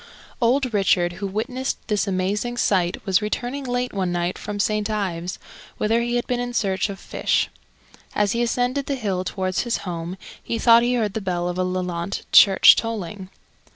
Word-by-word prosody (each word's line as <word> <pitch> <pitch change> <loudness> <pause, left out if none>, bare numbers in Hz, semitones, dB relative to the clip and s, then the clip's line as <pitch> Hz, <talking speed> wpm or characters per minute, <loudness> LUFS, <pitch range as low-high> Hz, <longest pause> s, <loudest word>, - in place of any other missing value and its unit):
Old 250 +1 +2
Richard, 180 -3 +2
who 200 - -1
witnessed 250 +6 -3
this 210 -2 0
amazing 200 +6 -1
sight, 185 -5 +1
was 190 +1 +2
returning 245 +6 -3
late 245 0 -2
one 190 -3 -1
night 175 +1 -1
from 205 -1 -6
St. 210 +1 0
Ives, 185 -4 -3 0.4
whither 225 +2 +1
he 240 0 -1
had 240 -1 0
been 245 -1 -1
in 245 0 -4
search 190 -2 0
of 195 -1 -7
fish. - - 0 0.7
As 205 -1 +2
he 235 - 0
ascended 250 +3 0
the 280 - -1
hill 195 -7 -2
towards 185 0 -2
his 240 -1 0
home, 175 +1 -5 0.2
he 230 - -3
thought 230 0 +6
he 245 +1 +1
heard 215 -5 0
the 220 - -3
bell 175 -2 -2
of 180 0 -3
Lelant 180 0 -2
church 195 -2 +8
tolling. 205 -4 -4
205 Hz, 180 wpm, -23 LUFS, 185-240 Hz, 0.7 s, church